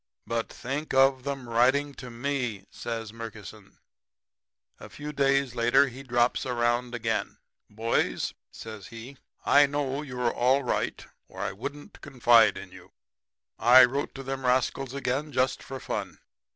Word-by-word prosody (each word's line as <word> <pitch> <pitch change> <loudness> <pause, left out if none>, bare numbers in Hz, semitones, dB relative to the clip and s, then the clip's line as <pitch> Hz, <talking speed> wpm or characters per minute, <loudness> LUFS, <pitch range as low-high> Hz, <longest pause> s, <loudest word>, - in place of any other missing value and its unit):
"'But 115 -1 -2
think 140 +3 -4
of 135 0 +4
'em 135 -3 -4
writing 130 +5 +2
to 125 -2 -9
ME!' 120 -5 -3
says 115 -2 -5
Murkison. 110 -4 -10 1.0
"A - - -11
few 150 +1 -7
days 140 -2 +2
later 125 +4 +3
he 125 +2 -10
drops 120 -2 +1
around 120 0 0
again. 115 -1 -2 0.3
"'Boys,' 110 +2 -1 0.2
says 110 -3 -9
he, 120 +4 -10 0.3
'I 145 0 +6
know 140 -1 -2
you 125 -4 -7
are 120 -1 +1
all 130 +3 +2
right 125 - -2 0.2
or - - -9
I - - -1
wouldn't 140 +9 -8
confide 120 -5 +4
in - - -9
you. - - -15 0.7
I 125 +2 +8
wrote 140 +3 -3
to 135 - -7
them 135 0 -4
rascals 130 +1 0
again 140 +3 -2
just 130 -1 0
for 135 0 -7
fun. - - -5
125 Hz, 150 wpm, -27 LUFS, 120-135 Hz, 1.0 s, I